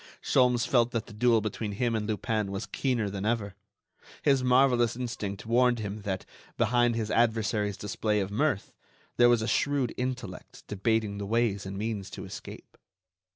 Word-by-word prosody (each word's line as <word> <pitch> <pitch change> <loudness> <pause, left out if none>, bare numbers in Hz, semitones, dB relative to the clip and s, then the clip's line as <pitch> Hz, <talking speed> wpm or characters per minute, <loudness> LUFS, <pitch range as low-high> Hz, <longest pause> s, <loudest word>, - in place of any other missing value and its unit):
Sholmes 125 -2 +3
felt 120 -2 +3
that 115 -1 -1
the 115 - -12
duel 115 +1 +3
between 105 0 -3
him 120 +3 0
and 110 -2 -1
Lupin 110 -2 -1
was 100 +2 -4
keener 125 -6 -1
than 100 -1 -4
ever. 105 -3 -1 0.7
His 135 -3 +3
marvellous 125 -2 +4
instinct 105 -5 -5
warned 120 +1 +3
him 105 -1 -5
that, 95 -2 -3 0.3
behind 120 +1 +3
his 110 -2 -2
adversary's 110 -3 +1
display 105 +1 -1
of 95 0 -2
mirth, 130 -1 0 0.4
there 120 0 +6
was 120 -2 +3
a - - -2
shrewd 140 -3 +1
intellect 125 -7 -5
debating 105 0 -1
the 100 - -4
ways 105 -3 0
and 95 0 -6
means 105 -2 -3
to - - -8
escape. - - -10
115 Hz, 165 wpm, -28 LUFS, 105-120 Hz, 0.7 s, there